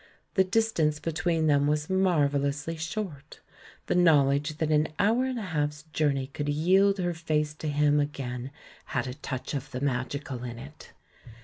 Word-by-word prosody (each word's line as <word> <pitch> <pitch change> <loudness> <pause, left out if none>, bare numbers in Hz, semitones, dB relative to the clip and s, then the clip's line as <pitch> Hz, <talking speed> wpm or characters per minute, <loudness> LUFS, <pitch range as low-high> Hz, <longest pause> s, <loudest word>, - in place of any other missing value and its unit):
The 190 - +4
distance 185 -7 +1
between 165 +1 0
them 145 -2 +3
was 150 0 0
marvellously 150 -5 +1
short 160 -3 -5 0.2
— - - -22
the - - 0
knowledge 150 -3 +3
that 155 -1 0
an 150 0 +3
hour 225 +5 +3
and 260 -1 -2
a 225 - -3
half's 150 -1 -1
journey 140 -3 +1
could 145 +2 -4
yield 190 +7 +3
her 175 -2 -1
face 155 -2 -1
to 155 +1 -6
him 150 0 +3
again 130 -3 -3 0.5
had 120 - +1
a 125 - -4
touch 130 -1 -5
of 140 0 -4
the 125 - -5
magical 130 -1 -3
in 120 -1 -6
it. 140 +5 -12
150 Hz, 170 wpm, -28 LUFS, 140-165 Hz, 0.5 s, The